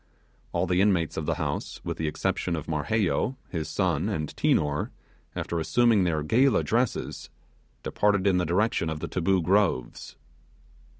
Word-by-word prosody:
All 85 +1 0
the 90 +1 +2
inmates 95 -5 +2
of 80 - -4
the - - +1
house, - - -4
with - - -4
the 80 - -2
exception 85 +3 -1
of 80 - -5
Marheyo, 100 - 0
his 80 -4 -4
son, - - 0
and 75 -1 -3
Tinor, 75 0 +1 0.5
after 85 - -2
assuming 110 +3 +3
their 80 -3 0
gala 125 - +3
dresses, 120 -1 -1 0.5
departed 105 -2 +1
in 95 -2 +3
the 90 - 0
direction 90 -1 +1
of 80 -1 -4
the - - -4
Taboo 90 0 +1
Groves. 95 -9 0
90 Hz, 155 wpm, -26 LUFS, 80-105 Hz, 0.5 s, assuming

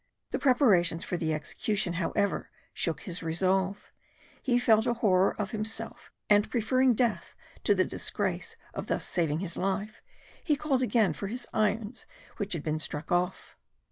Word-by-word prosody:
The - - -1
preparations 200 - +3
for - - -2
the 160 -2 -1
execution 175 +5 -1
however, 200 +3 0 0.2
shook 160 -3 -1
his 175 -1 -4
resolution; 185 +4 +1 0.7
he 245 -3 +2
felt 220 -3 +4
a 240 - +2
horror 195 -4 +3
of 205 -1 -2
himself, 220 0 -4 0.2
and 205 0 +4
preferring 255 +2 +3
death 235 -1 0 0.3
to - - +5
the - - +3
disgrace - - -2 0.2
of - - -5
thus - - -1
saving 160 -2 0
his 170 -3 -3
life, 195 +3 -2 0.4
he 300 - +2
called 275 -3 0
again 225 -8 +3
for 200 - -5
his 240 +4 -4
irons 215 +1 0 0.3
which 200 -3 -1
had 160 -4 -3
been 155 0 -1
struck 150 0 -4
off. 175 0 -1
200 Hz, 160 wpm, -29 LUFS, 175-230 Hz, 0.7 s, to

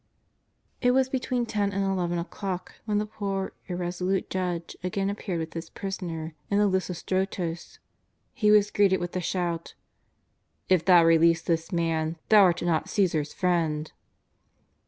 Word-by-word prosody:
It 250 0 +3
was 265 0 +3
between 255 -2 -1
ten 205 -3 -1
and 195 0 -1
eleven 180 -3 0
o'clock 185 +1 -5
when 210 -2 0
the 210 - 0
poor, 195 -2 -3
irresolute 180 +1 -2
judge 180 -3 -3
again 195 +2 -1
appeared 200 -3 -4
with 160 0 -5
his 165 0 -6
Prisoner 170 -5 -5 0.2
in 200 - +2
the 205 - +4
Lithostrotos. 185 -2 -2 0.6
He 215 -5 +2
was 210 -1 +5
greeted 195 -2 +3
with 175 0 -4
the 185 - -2
shout: 170 -2 -2
'^ - - -45 0.9
If 185 -3 +4
thou 175 -3 +7
release 165 0 +4
this 165 0 -1
Man, 165 -2 0
thou 215 -1 +8
art 175 -3 +3
not 170 -2 0
Caesar's 160 -7 +1
friend." 165 -5 0
180 Hz, 150 wpm, -27 LUFS, 170-200 Hz, 0.9 s, thou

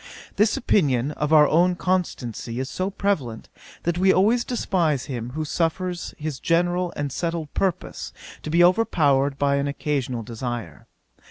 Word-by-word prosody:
This 210 +1 +3
opinion 140 - +2
of 150 0 -3
our 150 -2 +7
own 175 +4 +3
constancy 130 - -2
is 130 - -2
so 185 +5 -2
prevalent, 165 - -2 0.3
that 175 +1 -1
we 190 +1 +5
always 220 +7 +3
despise 170 - 0
him 120 -4 -5
who 155 0 -2
suffers 175 +3 -2
his 150 -3 -4
general 175 +1 +1
and 145 -1 -3
settled 165 0 -3
purpose 190 -4 -2 0.3
to - - -6
be 170 +3 +4
overpowered 145 -8 +3
by 140 0 +2
an 140 0 0
occasional 140 -4 -2
desire. 120 0 -6
155 Hz, 150 wpm, -24 LUFS, 135-180 Hz, 0.3 s, our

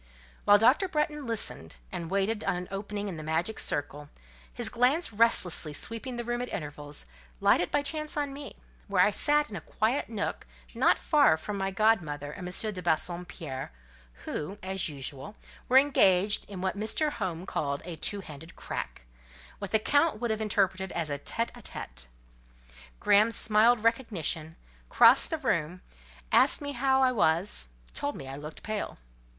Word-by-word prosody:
While 205 - +7
Dr. 255 - +4
Bretton 300 -4 -2
listened, 210 - -2 0.2
and 165 -1 -5
waited 200 +3 0
an 180 0 -1
opening 205 +1 -4
in 180 -4 -5
the - - -6
magic 165 +7 -1
circle, 145 0 -3 0.4
his - - 0
glance 250 +4 +2
restlessly 185 -8 +2
sweeping 230 - -5
the 240 - -3
room 240 +1 -2
at 245 - -4
intervals, 145 - -6 0.3
lighted 175 - +3
by 290 - +1
chance 305 +1 -3
on 285 -2 -1
me, 280 0 -8 0.3
where 190 -3 +4
I 210 - +2
sat 295 +7 +2
in - - -6
a 175 - -5
quiet 225 - -1
nook 215 -3 -4 0.3
not - - +3
far 290 - +4
from 205 +6 -5
my 195 0 0
godmother 175 -9 +1
and 180 +4 -7
M. 210 +4 -1
de 180 - -6
Bassompierre, 170 - -3 0.5
who, 185 +7 -4
as 190 -2 -1
usual, 140 +5 -6 0.3
were 255 - +6
engaged 205 -8 +4
in 190 -3 -7
what 190 +1 -1
Mr. 220 +9 0
Home 185 - -4
called 140 -6 -2
"a 175 -2 -5
two 200 +5 -1
handed 160 -1 -11
crack:" - - -6 0.5
what 200 -2 -5
the 220 - +4
Count 285 +2 +2
would 240 -1 -1
have 220 0 -2
interpreted 190 -3 0
as 165 -3 -2
a 140 - -2
tête 230 +10 -2
à - - -12
tête. - - -6 0.9
Graham 210 +3 +4
smiled 225 +1 +3
recognition, 190 - -1 0.3
crossed - - +6
the 320 - -1
room, 180 - -1 0.5
asked - - +5
me 285 -1 -4
how 265 0 +2
I 255 - +4
was, 165 - +2 0.3
told 285 0 -2
me 135 - -8
I 135 - -6
looked 150 +2 -9
pale. 215 -1 -4
200 Hz, 165 wpm, -29 LUFS, 165-235 Hz, 0.9 s, While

